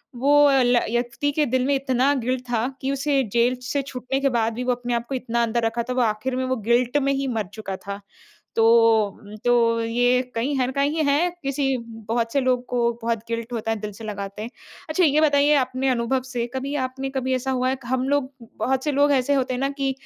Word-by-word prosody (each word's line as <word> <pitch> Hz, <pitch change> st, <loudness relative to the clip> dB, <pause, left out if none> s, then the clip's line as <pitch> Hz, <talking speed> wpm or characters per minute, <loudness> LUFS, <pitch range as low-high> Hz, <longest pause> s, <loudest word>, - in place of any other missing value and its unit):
वो 290 Hz, +3 st, +5 dB
ल 250 Hz, -2 st, +4 dB
य 235 Hz, +1 st, 0 dB
व्यक्ति 240 Hz, +4 st, -1 dB
के 300 Hz, -1 st, +2 dB
दिल 255 Hz, +1 st, +1 dB
में 280 Hz, -, +3 dB
इतना 265 Hz, +1 st, +2 dB
गिल्ट 255 Hz, +1 st, -1 dB
था 235 Hz, +1 st, 0 dB
कि 270 Hz, +1 st, -1 dB
उसे 275 Hz, 0 st, +1 dB
जेल 240 Hz, +2 st, +3 dB
से 280 Hz, +3 st, -1 dB
छूटने 255 Hz, +1 st, -3 dB
के 275 Hz, -, +3 dB
बाद 230 Hz, -2 st, 0 dB
भी 250 Hz, +2 st, -4 dB
वो 250 Hz, -, +1 dB
अपने 245 Hz, 0 st, -4 dB
आप 235 Hz, 0 st, -1 dB
को 270 Hz, -, -2 dB
इतना 235 Hz, -2 st, -1 dB
अंदर 235 Hz, +1 st, 0 dB
रखा 230 Hz, +1 st, -1 dB
था। -, -, 0 dB
वो 255 Hz, -, +1 dB
आखिर 225 Hz, +3 st, 0 dB
में 260 Hz, 0 st, -1 dB
वो 260 Hz, 0 st, 0 dB
गिल्ट 245 Hz, +3 st, +3 dB
में 275 Hz, -, +2 dB
ही 275 Hz, 0 st, -1 dB
मर 220 Hz, -5 st, -1 dB
चुका 210 Hz, -3 st, -5 dB
था। 200 Hz, 0 st, -7 dB, 0.6 s
तो, 225 Hz, -2 st, +4 dB, 0.3 s
तो 230 Hz, -1 st, +3 dB
ये 245 Hz, +2 st, +2 dB
कहीं 260 Hz, +5 st, 0 dB
हैं 255 Hz, 0 st, 0 dB
कहीं 290 Hz, +3 st, +1 dB
हैं 305 Hz, +5 st, +2 dB
किसी 270 Hz, -1 st, 0 dB, 0.3 s
बहुत 230 Hz, 0 st, -1 dB
से 280 Hz, -, +3 dB
लोग 255 Hz, -1 st, +1 dB
को 240 Hz, -1 st, +1 dB
बहुत 230 Hz, 0 st, -1 dB
गिल्ट 230 Hz, +1 st, -4 dB
होता 225 Hz, -1 st, -2 dB
है 225 Hz, -, -1 dB
दिल 210 Hz, -, -4 dB
से 225 Hz, -, -11 dB
लगाते 200 Hz, -1 st, -6 dB
हैं। 225 Hz, -, -5 dB, 0.4 s
अच्छा 335 Hz, +4 st, +2 dB
ये 305 Hz, -1 st, +4 dB
बताइए 290 Hz, -1 st, +4 dB
अपने 260 Hz, 0 st, 0 dB
अनुभव 255 Hz, +1 st, 0 dB
से 245 Hz, -3 st, -3 dB
कभी 270 Hz, +2 st, -3 dB
आपने 265 Hz, +1 st, -5 dB
कभी 260 Hz, -1 st, -2 dB
ऐसा 260 Hz, +1 st, -2 dB
हुआ 255 Hz, 0 st, +1 dB
है 260 Hz, -, 0 dB
कि 255 Hz, -2 st, -13 dB
हम 255 Hz, 0 st, 0 dB
लोग 285 Hz, -1 st, 0 dB, 0.3 s
बहुत 265 Hz, 0 st, 0 dB
से 300 Hz, -, 0 dB
लोग 285 Hz, +1 st, +3 dB
ऐसे 275 Hz, +1 st, +2 dB
होते 260 Hz, -2 st, 0 dB
हैं 250 Hz, -, -3 dB
ना 275 Hz, -, +1 dB
कि 275 Hz, -1 st, -1 dB
255 Hz, 235 wpm, -23 LUFS, 235-275 Hz, 0.6 s, वो